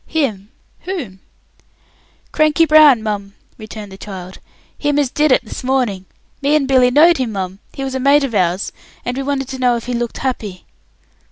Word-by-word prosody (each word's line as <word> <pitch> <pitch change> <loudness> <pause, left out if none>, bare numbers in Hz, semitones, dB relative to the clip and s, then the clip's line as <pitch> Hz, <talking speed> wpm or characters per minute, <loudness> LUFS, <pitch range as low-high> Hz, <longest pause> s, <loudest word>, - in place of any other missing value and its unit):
"Him! 220 -11 -2 0.3
Whom?" 275 - -6 1.1
"Cranky 310 +1 +3
Brown, 305 -7 +6
mum," 200 -2 -4 0.2
returned 215 -2 -9
the 190 - -12
child; 185 -2 -9 0.4
"him 290 -1 -1
as 280 -4 +1
did 300 -1 +2
it 255 - +3
this 215 - -7
morning. 250 -8 0 0.4
Me 285 +2 +2
and 285 -3 +1
Billy 255 -2 +4
knowed 320 +6 +5
him, 245 -4 -2
mum; 190 -1 -4
he 270 - -5
was 265 -1 -4
a 265 - -2
mate 280 +2 +4
of 265 -4 -3
ours, 185 -1 0 0.3
and 245 - -2
we 270 - -2
wanted 270 -1 -2
to 265 -1 -6
know 250 -1 +3
if 235 - -5
he 250 - -3
looked 240 -1 -3
happy." 215 -8 -4
255 Hz, 185 wpm, -17 LUFS, 205-280 Hz, 1.1 s, Brown